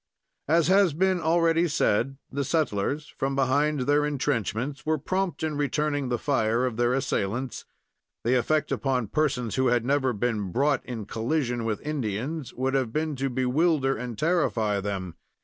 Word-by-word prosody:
As 165 0 +3
has 190 -3 +4
been 185 +2 +1
already 165 +1 +3
said, 135 -2 +1
the 140 +1 -1
settlers, 145 -1 -1
from 135 0 0
behind 140 +2 +2
their 145 +3 +2
intrenchments, 135 -2 -1
were 155 0 +1
prompt 185 +3 -2
in 155 -2 -1
returning 145 -1 0
the 120 - 0
fire 120 -3 +1
of 125 -3 -2
their 120 +1 +2
assailants. 125 -1 -2 0.6
The 120 - +2
effect 150 +5 +1
upon 130 -6 0
persons 135 -6 0
who 130 0 +3
had 120 -1 +2
never 135 -1 +2
been 105 -4 -2
brought 140 +5 +1
in 115 -4 -5
collision 120 +1 -1
with 110 +2 -3
Indians 140 +1 -3
would 130 +1 -1
have 130 -4 0
been 155 +2 -1
to 135 +1 -1
bewilder 135 +2 +1
and 120 -1 -6
terrify 120 - +1
them. 95 -3 -4
135 Hz, 160 wpm, -26 LUFS, 120-150 Hz, 0.6 s, has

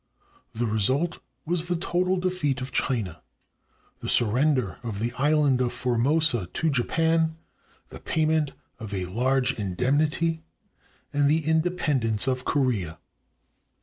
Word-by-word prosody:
The 120 +2 0
result 130 - 0 0.3
was 175 +1 -1
the 175 - 0
total 180 +2 0
defeat 180 -7 -1
of 130 0 -6
China, 105 - -2 0.8
the - - -5
surrender 125 -1 +2
of 115 -4 -5
the 115 +3 -2
island 145 -1 +2
of 120 -1 +1
Formosa 125 - +1
to 160 - 0
Japan, 160 +5 +1 0.5
the - - -10
payment 155 -2 0 0.3
of 105 -2 -6
a 95 -1 -2
large 125 +6 +1
indem 105 +9 +1
nity, 160 +1 0 0.7
and 145 0 +3
the 155 0 +1
independence 155 - +1
of 130 -1 -1
Korea. 110 - 0
135 Hz, 125 wpm, -26 LUFS, 120-160 Hz, 0.8 s, and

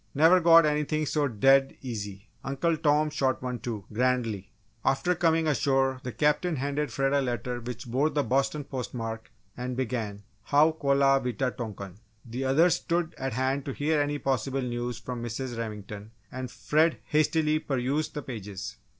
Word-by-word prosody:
Never 165 +6 +6
got 165 -1 +7
anything 150 +1 0
so 150 0 +1
dead 135 +3 +3
easy! 105 -4 -6 0.2
Uncle 140 +5 0
Tom 150 0 +2
shot 130 -5 0
one, 125 -1 -3
too," 110 -3 -5
grandly. 115 -5 0 0.3
After 135 +7 +2
coming 165 -2 +2
ashore, 135 -2 +2
the 125 -2 -5
Captain 150 - +1
handed 145 +2 -2
Fred 135 0 0
a 140 - +3
letter 125 -1 -2
which 120 +1 -6
bore 130 +6 +1
the 145 -2 0
Boston 135 +4 0
post 130 -2 -6
mark 115 -1 -5 0.2
and 125 0 -4
began 110 -5 -3 0.2
"How 150 +3 +5
Kolah 140 -3 +3
Wita 125 +1 -1
tonkan." 100 -6 -7 0.3
The 125 +3 -4
others 160 +7 +4
stood 170 -1 -1
at 135 -2 -2
hand 130 +3 0
to 135 - -3
hear 150 +2 +1
any 145 0 -1
possible 135 0 -1
news 120 -1 -3
from 125 0 -6
Mrs. 120 +2 -4
Remington, 105 -2 -6 0.2
and 130 0 -5
Fred 155 +5 +1
hastily 155 0 +2
perused 140 +2 -1
the 150 - -4
pages. 105 -5 -7
135 Hz, 165 wpm, -28 LUFS, 120-150 Hz, 0.3 s, got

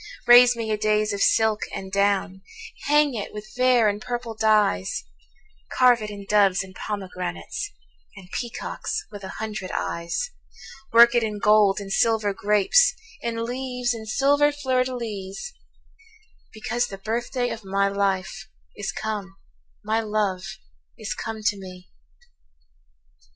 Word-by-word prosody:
Raise 245 0 +8
me 225 -2 -3
a 215 - +1
dais 215 0 +1
of 200 - -3
silk 220 -1 +3
and 190 0 -7
down; 200 -1 +1 0.4
Hang 295 -1 +3
it 215 -4 -5
with 215 +1 -9
vair 250 -3 +4
and 205 0 -1
purple 240 -1 -4
dyes; 215 - +1 0.7
Carve 245 -2 +5
it 210 - -4
in 200 -1 -8
doves 200 -3 +3
and 190 -1 -13
pomegranates, 185 - -5 0.5
And 180 - -12
peacocks 240 -2 -4
with 205 -1 -9
a 190 - -7
hundred 215 -4 -5
eyes; 170 - -3 0.6
Work 235 +1 +8
it 240 - +3
in 215 -2 -2
gold 210 -1 +4
and 195 -1 -5
silver 220 -3 +2
grapes, 210 - +3 0.3
In 230 -1 -2
leaves 250 0 -2
and 220 -1 -8
silver 285 +5 +3
fleurs 260 -3 0
de 255 - -5
lys; 215 - -6 1.0
Because 240 +3 -2
the 195 - -8
birthday 240 +4 -2
of 225 - -6
my 195 +1 +1
life 200 +2 -2 0.3
Is 205 - -4
come, 205 -3 -5 0.5
my 215 +2 0
love 210 -4 -1 0.6
is 215 -2 -4
come 220 0 -6
to 205 -1 +1
me. 185 -1 -11
215 Hz, 140 wpm, -24 LUFS, 200-240 Hz, 1.0 s, Raise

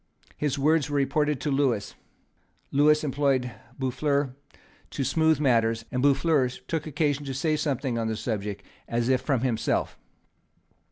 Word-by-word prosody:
His 150 -2 -1
words 150 +1 +2
were 145 - -1
reported 145 +1 +1
to 150 - -1
Lewis. 135 -7 0 0.8
Lewis 150 +2 +4
employed 135 -3 +1 0.3
Boufflers 140 +1 0 0.6
to 140 - -3
smooth 160 +1 +2
matters; 115 -5 +2
and 125 -1 -1
Boufflers 140 -2 +2
took 160 -2 -2
occasion 145 -1 0
to 135 -1 -4
say 155 +3 +1
something 135 -5 -1
on 115 - -1
the 110 - -1
subject 105 -3 -4 0.2
as 120 +1 -1
if 130 -1 +3
from 135 -6 0
himself. 120 -4 -1
135 Hz, 145 wpm, -26 LUFS, 125-150 Hz, 0.8 s, Lewis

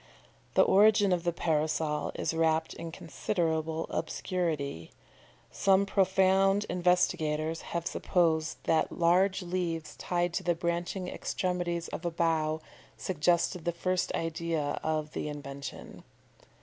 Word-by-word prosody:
The - - +7
origin 205 0 +5
of 175 -1 -1
the 175 - +2
Parasol 155 -2 0
is - - -1
wrapped 160 0 +1
in 165 0 -7
considerable 160 -1 -2
obscurity. 155 - -2 0.6
Some 195 0 +3
profound 195 +1 +3
investigators 165 -3 +1 0.2
have 170 - -4
supposed 160 -3 +1
that 160 -1 +2
large 180 +3 +2
leaves 175 -3 -3
tied 175 -1 -1
to - - -2
the 175 0 +1
branching 170 +2 -2
extremities 175 -3 -2
of - - -6
a 175 - 0
bough 160 -2 0 0.4
suggested 175 0 +1
the 175 - 0
first 180 +2 -1
idea 165 -2 -2
of 155 -1 -1
the - - -3
invention. 140 -2 -8
170 Hz, 120 wpm, -30 LUFS, 160-180 Hz, 0.6 s, The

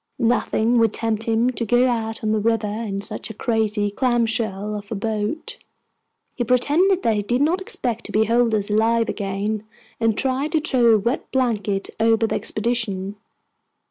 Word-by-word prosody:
Nothing 235 -1 +1
would 225 -2 +3
tempt 225 -1 -1
him 230 +2 +2
to 240 - -4
go 245 +3 +3
out 225 -2 -2
on 215 - 0
the 215 - +1
river 225 0 +1
in 205 -1 -3
such 215 +2 -5
a 220 - -8
crazy 215 -3 0
clam 240 +1 +1
shell 215 -3 -2
of 205 0 -8
a - - -1
boat. 220 - -3 0.7
He 245 - -2
pretended 300 - +2
that 225 - +2
he 210 - 0
did 240 +5 -1
not 345 +5 +1
expect 270 - -1
to - - -5
behold 225 +1 +2
us 205 -1 -1
alive 225 +2 +2
again, 205 +1 -3 0.4
and 225 -2 +1
tried 270 +4 -1
to 320 - +3
throw 245 -7 +3
a - - +4
wet 235 +6 -2
blanket 215 -6 -1
over 225 0 +3
the - - -2
expedition. 215 -4 -1
225 Hz, 175 wpm, -22 LUFS, 210-245 Hz, 0.7 s, a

